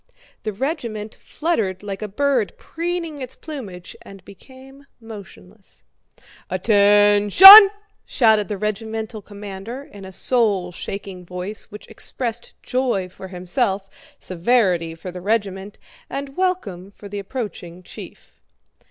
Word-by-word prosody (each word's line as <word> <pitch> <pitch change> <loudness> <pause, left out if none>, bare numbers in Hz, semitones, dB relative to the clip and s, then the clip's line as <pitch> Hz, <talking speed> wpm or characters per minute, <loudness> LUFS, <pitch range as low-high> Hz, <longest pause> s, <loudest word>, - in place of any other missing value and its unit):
The 215 - -4
regiment 225 - -4
fluttered 215 - -3
like 200 -1 -6
a 215 - -4
bird 255 +1 -1
preening 335 -3 -5
its 255 0 -6
plumage 210 - -9
and 195 -2 -14
became 265 +7 -16
motionless. 200 - -14 0.7
"Att 185 +2 -5
ention!" 205 - +9 0.3
shouted 220 -4 +2
the 210 - -4
regimental 220 +1 -4
commander 205 +5 -9
in 205 -8 -14
a 190 - -9
soul 200 -4 0
shaking 190 0 -7
voice 180 +4 -6
which 210 -1 -11
expressed 235 -2 -5
joy 245 -8 -1
for 190 +1 -11
himself, 190 +2 -3 0.3
severity 180 -3 0
for 180 +3 -9
the 180 0 -9
regiment, 200 -1 -2 0.3
and 275 0 -6
welcome 230 - -2
for 200 0 -13
the 205 0 -6
approaching 190 -5 -7
chief. - - -13
205 Hz, 120 wpm, -21 LUFS, 190-250 Hz, 0.7 s, ention